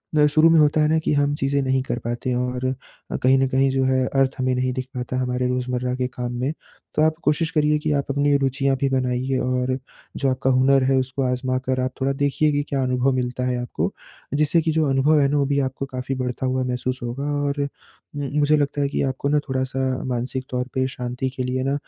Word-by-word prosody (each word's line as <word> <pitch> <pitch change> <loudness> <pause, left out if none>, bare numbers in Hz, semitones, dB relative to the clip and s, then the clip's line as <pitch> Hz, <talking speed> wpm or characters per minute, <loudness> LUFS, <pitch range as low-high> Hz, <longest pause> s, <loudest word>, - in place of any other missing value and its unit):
ना 150 -1 +5
शुरू 155 +2 +5
में 165 -1 +5
होता 150 0 +4
है 150 - +4
ना 160 +1 +3
कि 160 - 0
हम 145 0 +2
चीज़ें 140 0 0
नहीं 130 0 +1
कर 125 -2 -3
पाते 120 +2 -2
हैं 125 - 0
और 125 0 -2 0.5
अ, - - -1
कहीं 130 +1 +4
न 135 - +3
कहीं 135 +1 +2
जो 135 0 +1
है 130 0 +2
अर्थ 135 -1 +1
हमें 130 0 +1
नहीं 125 0 0
दिख 130 0 -3
पाता 125 +1 -3
हमारे 125 0 0
रोज़मर्रा 125 0 -1
के 130 0 -1
काम 125 -1 -5
में। 135 +5 -1 0.4
तो - - +2
आप 155 0 +3
कोशिश 155 +2 +1
करिए 150 0 +2
कि 150 0 -1
आप 140 - -3
अपनी 145 +1 +2
रुचियाँ 135 0 +1
भी 140 - +2
बनाइए 130 0 0
और 130 0 0 0.4
जो 140 - +1
आपका 130 0 0
हुनर 130 +1 +4
है 135 +1 +2
उसको 130 +1 -1
आज़मा 130 0 0
कर 130 0 0
आप 130 - -1
थोड़ा 135 +1 +1
देखिए 145 +2 +1
कि 145 0 +1
क्या 135 -1 0
अनुभव 125 +1 +1
मिलता 125 0 -2
है 125 -1 0
आपको। 120 - -2 0.4
जिससे 150 +3 +3
कि 160 0 0
जो 160 0 +2
अनुभव 140 +3 +3
है 140 - +4
ना 145 - +1
वो 140 - +2
भी 140 +1 +1
आपको 135 0 -2
काफ़ी 130 0 -4
बढ़ता 125 0 -3
हुआ 130 0 0
महसूस 125 +1 -2
होगा 120 +3 -4 0.2
और 140 0 -1 0.6
उम, 145 - -3 0.2
मुझे 150 +1 +4
लगता 145 0 0
है 140 - +2
कि - - -1
आपको 135 +1 -1
ना 150 +1 +3
थोड़ा-सा 130 0 -2 0.2
मानसिक 130 +1 -2
तौर 125 -1 -1
पे 130 -1 +1
शांति 125 0 -3
के 130 0 -4
लिए 130 +1 -1
ना 135 +1 0
130 Hz, 240 wpm, -23 LUFS, 125-140 Hz, 0.6 s, ना